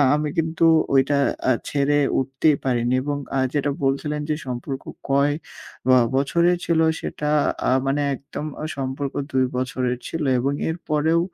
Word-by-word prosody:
আমি 150 0 -1
কিন্তু 160 +1 -1 0.3
ওইটা 135 +2 +3 0.3
আ - - +5 0.2
ছেড়ে 145 0 +2 0.2
উঠতেই 135 +3 +2
পারিনি 120 -1 +1
এবং 145 0 -2 0.2
আ - - +2
যেটা 145 -1 +1
বলছিলেন 150 +2 0
যে 155 - +1
সম্পর্ক 130 +2 -4 0.3
কয় 140 +1 +3 0.6
বা 130 - +7 0.2
বছরে 170 +6 +3
ছিল 170 -1 +2 0.2
সেটা 150 - -3 0.4
আ - - +3
মানে 140 +2 +1
একদম 140 +3 -7 0.2
অ - - -2
সম্পর্ক 135 +1 -3 0.2
২ 130 0 +2
বছরের 125 -1 -1
ছিল 165 -1 -3 0.2
এবং 135 +3 0 0.2
এর 160 - -2
পরেও 155 +2 +2
140 Hz, 155 wpm, -23 LUFS, 130-150 Hz, 0.6 s, বা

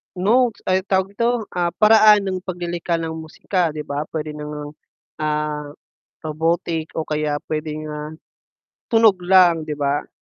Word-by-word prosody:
notes 225 +5 +2
ay, 185 0 +2
anong - - -45
tawag 190 0 +3
dito, 235 +1 +2 0.3
ah, 175 -1 +1
paraan 215 -1 +6
ng 185 -1 -2
paglilikha 175 -2 -3
ng 160 -1 -4
musika, 160 +2 -2
'di 150 0 -6
ba? 145 +1 -2
Puwede 155 -1 -4
na 150 - -7
ngang, 150 0 -6 0.5
ah, 150 -1 -2 0.6
robotic 165 +1 -1
o 160 - -1
kaya 150 -1 -1
puwedeng, 155 0 -4
ah, 150 +1 -6 0.8
tunog 225 -5 +5
lang, 175 -4 +4
'di 150 - -3
ba? 145 0 -1
165 Hz, 155 wpm, -21 LUFS, 150-185 Hz, 0.8 s, paraan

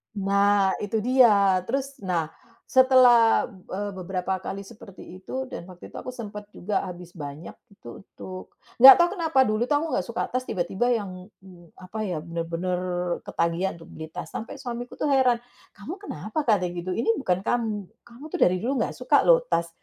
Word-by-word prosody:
Nah, 200 0 +2
itu 210 +1 -2
dia. 210 -6 +5
Terus, 275 +3 -3
nah, 165 -4 -1 0.4
setelah, 255 -3 +5
eee, 195 +1 -6
be-beberapa 185 +1 -3
kali 200 - -4
seperti 195 -2 -13 0.2
itu, 260 +6 -5
dan 170 - -7
waktu 180 -1 -12
itu - - -11
aku 255 - -7
sempat 210 -3 -8
juga 200 +2 -2
habis 175 -1 -9
banyak. 145 +2 -8 0.2
Itu 120 -6 -12
untuk, 185 -1 -10 0.2
enggak 265 +2 +11
tahu 345 - +4
kenapa 320 -5 +2
dulu 215 -1 +1
kamu 295 +3 0
enggak - - 0
suka 235 - -3
tas, 255 0 -2
tiba-tiba 195 +6 -1
yang 205 -4 -2 0.3
yang 175 -3 -16
apa 185 +4 -8
ya, 170 -5 -3
benar-benar 170 +2 -3 0.5
ketagihan 170 +3 -1
untuk 165 - -15
beli 160 - -7
tas 180 - -6
sampai 225 - -6
suamiku 245 -1 -6
tuh 295 - -2
heran, 255 -3 +3 0.3
'Kamu 300 - -8
kenapa?' 310 - -5
katanya, 185 -6 +1
gitu. 180 +2 -4
"Ini 230 - -1
bukan 185 -9 0
kamu, 215 -4 -2 0.2
kamu 240 +4 -15
tuh - - -4
dari 180 - +5
dulu 250 +4 -1
enggak - - -6
suka - - +2
loh - - +6
tas, 170 0 0
205 Hz, 175 wpm, -25 LUFS, 180-245 Hz, 0.5 s, enggak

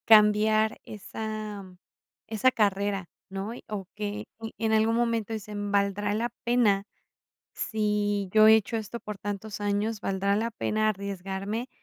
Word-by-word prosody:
Cambiar 215 0 +5
esa 215 0 -6 0.6
esa 225 +4 +3
carrera, 200 -3 0 0.2
¿no? 195 +3 -4
Y - - -10
o 205 -3 -4
que 210 0 -4
y 225 0 -6
en 220 - +2
algún 220 +1 +3
momento 230 -2 0
dicen: 205 -1 -4
"¿Valdrá 200 0 +1
la 235 +2 0
pena? 220 -5 +3 0.7
Si 210 -2 0
yo 215 0 +7
he 220 - +9
hecho 220 +1 +1
esto 225 +2 -5
por 210 -1 -6
tantos 205 +1 -5
años, 205 +1 0
¿valdrá 200 0 +1
la 230 +2 0
pena 215 -1 +1
arriesgarme, 200 +3 -3
210 Hz, 140 wpm, -28 LUFS, 200-220 Hz, 0.7 s, he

